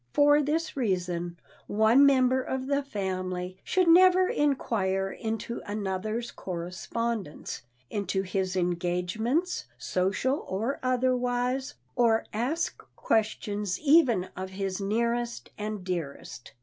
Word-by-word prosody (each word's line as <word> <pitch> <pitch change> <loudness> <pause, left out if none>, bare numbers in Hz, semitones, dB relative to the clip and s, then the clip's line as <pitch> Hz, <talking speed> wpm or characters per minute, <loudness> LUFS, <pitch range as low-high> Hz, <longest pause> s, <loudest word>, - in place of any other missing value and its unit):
For 290 +1 +5
this 315 +3 -1
reason 180 -7 -1 0.3
one 220 +7 +5
member 260 -1 +4
of 260 0 -3
the 280 +1 +1
family 185 -6 -4
should 370 -2 +2
never 370 +2 +7
inquire 195 - 0
into 225 +1 -4
another's 210 +3 -3
correspondence, 185 +2 -4 0.3
into 195 -2 -1
his 190 0 -2
engagements, 180 - 0
social 195 +10 0
or 220 +9 -1
otherwise, 255 +1 0 0.2
or 230 -2 +3
ask 270 +10 -1
questions 210 -3 0
even 275 - +4
of 185 0 -5
his 195 0 -3
nearest 235 +3 -1
and 210 -2 -4
dearest. 160 -9 -5
220 Hz, 105 wpm, -28 LUFS, 185-260 Hz, 0.3 s, never